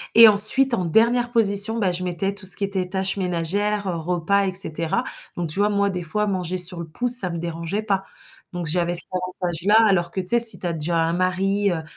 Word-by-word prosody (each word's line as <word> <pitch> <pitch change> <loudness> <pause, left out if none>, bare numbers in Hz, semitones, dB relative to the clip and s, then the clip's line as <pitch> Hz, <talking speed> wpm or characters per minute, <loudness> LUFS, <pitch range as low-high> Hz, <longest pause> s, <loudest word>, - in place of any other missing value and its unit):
et 230 0 +8
ensuite, 215 +6 +7
en 185 -6 -2
dernière 235 +7 0
position, 220 0 +3
ben, 195 -4 -1
je 175 +1 -6
mettais 180 +3 -4
tout 200 -1 -8
ce 185 - +5
qui - - -6
était 195 -2 -4
tâches 190 +1 -3
ménagères, 195 +3 -3 0.2
repas 180 +4 -1
et 190 - -4
cetera, 165 -3 +1 0.3
donc 175 -2 -5
tu 155 - -4
vois? 205 - +2
Moi, 200 -1 -1
des 180 -2 -6
fois, 210 +6 -3
manger 185 -2 -4
sur 180 0 -4
le 170 - -7
pouce, 245 +10 -2
ça 185 - 0
me 170 -1 -6
dérangeait 170 +4 -6
pas, 195 -2 -3 0.5
donc 175 -1 -6
j'avais 175 +2 -2
cet 175 - 0
avantage-là, 180 +1 -3
alors 175 -4 0
que, - - -6
tu 180 - -8
sais? 235 +5 +4
Si 235 -1 +6
tu - - -8
as 170 - -4
déjà 165 +2 -3
un 165 0 -1
mari, 190 +3 -2
heu, 160 -2 -5
185 Hz, 230 wpm, -20 LUFS, 175-205 Hz, 0.5 s, et